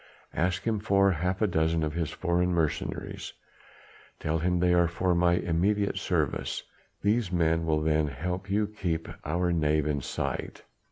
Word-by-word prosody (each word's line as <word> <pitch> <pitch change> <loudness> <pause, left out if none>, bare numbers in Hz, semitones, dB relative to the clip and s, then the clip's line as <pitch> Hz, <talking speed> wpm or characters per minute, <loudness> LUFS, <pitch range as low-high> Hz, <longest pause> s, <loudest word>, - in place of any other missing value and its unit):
Ask 90 +2 0
him 110 -2 0
for 100 -2 +3
half 90 +4 -1
a - - +4
dozen 80 -2 +1
of 75 -1 -1
his 80 -2 -1
foreign 90 +1 0
mercenaries; 85 -4 -2 0.9
tell 80 +1 -1
him 90 +2 +1
they 90 0 +3
are 85 -1 +4
for 90 +2 0
my 85 0 +3
immediate 95 +4 +1
service. - - -1 0.4
These 105 -1 +2
men 80 -1 +1
will 75 -1 +2
then 75 -1 +2
help 90 +8 -4
you 105 +2 +2
to 105 - -11
keep 85 -6 -2 0.2
our 85 +3 0
knave 75 -2 +2
in 75 -2 0
sight. - - -4
85 Hz, 165 wpm, -28 LUFS, 80-95 Hz, 0.9 s, a